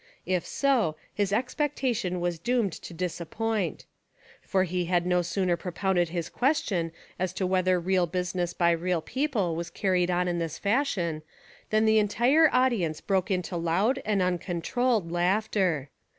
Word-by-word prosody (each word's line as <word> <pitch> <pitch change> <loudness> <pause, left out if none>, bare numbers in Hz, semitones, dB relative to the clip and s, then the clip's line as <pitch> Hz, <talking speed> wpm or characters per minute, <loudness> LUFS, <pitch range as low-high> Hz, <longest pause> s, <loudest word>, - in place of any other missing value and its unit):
If 180 -2 -1
so, 250 - +1 0.2
his 200 -1 0
expectation 245 - -1
was 175 -1 -2
doomed 235 0 +1
to - - -9
disappointment. 180 +4 -3 0.6
For 190 -1 +1
he 180 0 -1
had 175 0 +1
no 180 0 +2
sooner 180 0 0
pro 180 +1 -6
pounded 175 -1 +1
his 170 -1 -3
question 205 - 0 0.3
as 185 -1 0
to 190 - -1
whether 185 0 +2
real 180 0 +1
busi 180 +1 -2
ness 175 -2 -1
by 170 -1 +3
real 170 0 0
people 235 - -1
was 170 +1 -4
carried 180 0 +1
on 180 0 +1
in 175 -1 -1
this 165 -2 -3
fash 240 +4 +1
Ion 165 -3 -2 0.5
than 215 +1 +3
the 220 0 +5
entire 245 +10 +4
audience 235 -12 +1
broke 190 -2 0
into 180 -1 -1
loud 190 +11 +1
and 205 -3 +1
uncontrolled 180 +3 0
laughter. 175 -5 +1
185 Hz, 160 wpm, -27 LUFS, 175-215 Hz, 0.6 s, the